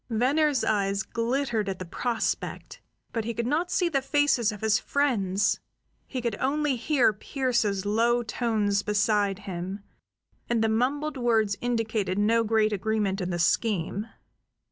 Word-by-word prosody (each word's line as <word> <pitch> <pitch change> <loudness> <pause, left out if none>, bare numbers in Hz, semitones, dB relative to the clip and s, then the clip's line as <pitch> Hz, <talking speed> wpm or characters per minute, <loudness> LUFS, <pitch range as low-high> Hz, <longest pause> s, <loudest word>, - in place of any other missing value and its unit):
Venner's 270 +4 +2
eyes 195 -2 +1
glittered 230 -3 -1
at 190 - -3
the 185 - -6
prospect; 230 +6 -3 0.3
but 225 - -1
he 230 +1 -4
could 235 - -2
not 310 +7 0
see 355 0 +1
the 280 -5 0
faces 270 -5 +2
of 210 - -9
his 220 -1 +3
friends; 210 -9 +1 0.5
he 255 -3 -4
could 235 -4 -1
only 290 +1 +1
hear 250 -2 +2
Pearse's 220 -4 -1
low 235 +3 +2
tones 215 -4 0
beside 205 -1 +1
him, 190 +2 -5 0.7
and 235 -2 +2
the 225 - +2
mumbled 275 +7 0
words 225 -4 +2
indicated 225 -5 -1
no 225 +3 +3
great 215 -1 +2
agreement 205 -1 -1
in 180 - -2
the 175 - -2
scheme. 200 +3 0
225 Hz, 145 wpm, -27 LUFS, 205-250 Hz, 0.7 s, his